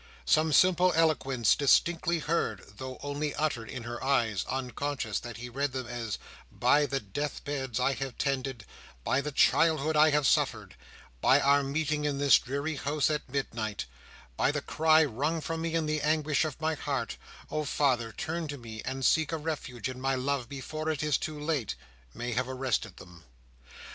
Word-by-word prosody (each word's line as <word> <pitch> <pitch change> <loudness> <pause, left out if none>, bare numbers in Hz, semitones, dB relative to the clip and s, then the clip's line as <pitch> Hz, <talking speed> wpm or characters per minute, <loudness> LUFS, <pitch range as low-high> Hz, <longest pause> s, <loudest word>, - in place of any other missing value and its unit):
Some 155 +1 +3
simple 185 +2 +5
eloquence 135 -7 +3
distinctly 165 +4 +3
heard, 150 - -1
though 130 -1 -6
only 145 +1 -2
uttered 145 -7 -1
in 125 -3 -6
her 120 +1 -6
eyes, 115 -8 +1
unconscious 130 -2 -2
that 120 -3 -8
he 120 +2 -6
read 135 +2 -2
them 130 -1 -3
as 120 -3 -4 0.3
"By 145 +4 +3
the 135 -1 -1
death 145 +8 -4
beds 135 -4 -2
I 135 +2 +2
have 135 0 -5
tended, 135 -4 -2 0.4
by 130 - +1
the 150 +2 -4
childhood 155 +1 +3
I 155 +1 +6
have 150 -1 +2
suffered, - - +1 0.5
by 135 - +5
our 140 0 +4
meeting 150 +2 -1
in 145 -2 0
this 140 0 +6
dreary 140 +4 -3
house 145 +2 0
at 150 -2 -3
midnight, 115 -6 -3 0.5
by - - +3
the 150 0 -2
cry 160 0 +4
wrung 150 +5 -1
from 165 +1 -4
me 165 0 -2
in 165 -1 +1
the 155 0 -1
anguish 155 0 +1
of 155 -4 -5
my 160 0 0
heart, 135 -5 -3 0.3
oh, 155 - -1
father, 130 -5 +1
turn 165 +4 -3
to 145 -1 -5
me 110 -3 -8
and 130 0 -3
seek 160 -1 +3
a 165 - -1
refuge 145 -7 -4
in 130 0 -7
my 135 0 +1
love 130 -1 -1
before 155 +3 -4
it 150 -2 -1
is 150 -2 +2
too 155 -1 -5
late!" 150 - -1 0.4
may 120 - -4
have 125 +2 -1
arrested 130 -6 -2
them. 85 -2 -13
140 Hz, 180 wpm, -29 LUFS, 125-155 Hz, 0.5 s, I